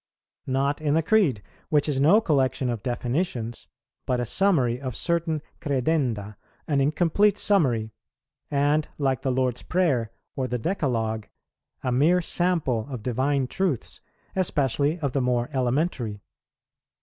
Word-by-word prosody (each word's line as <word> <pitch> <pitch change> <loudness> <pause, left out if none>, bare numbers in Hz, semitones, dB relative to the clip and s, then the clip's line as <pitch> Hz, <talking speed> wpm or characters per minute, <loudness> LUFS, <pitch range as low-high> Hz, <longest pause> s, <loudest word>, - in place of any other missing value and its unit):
Not 140 +3 0
in 150 -1 +1
the 165 - +2
Creed, 155 - +2 0.3
which 150 -1 +3
is 140 -3 0
no 170 +10 +6
collection 135 - +1
of 115 -3 -4
definitions, 120 - -2 0.4
but 125 -1 +1
a 120 - -1
summary 130 - +2
of 130 -4 -4
certain 165 -3 0 0.2
credenda, 125 -7 -1 0.3
an 140 -3 +2
incomplete 175 +8 +2
summary, 125 - +2 0.6
and, 145 +1 +2
like 135 -4 0
the 130 - 0
Lord's 125 -1 0
Prayer 140 -12 0 0.2
or 130 -2 -1
the 125 - -2
Decalogue, 115 - -1 0.6
a 130 - 0
mere 155 +8 +4
sample 165 -10 0
of 125 -6 -6
divine 130 +3 0
truths, 165 - -2 0.3
especially 145 -4 +1
of 140 -3 0
the 135 - 0
more 125 -1 0
elementary. 125 - -1
135 Hz, 135 wpm, -25 LUFS, 125-160 Hz, 0.6 s, no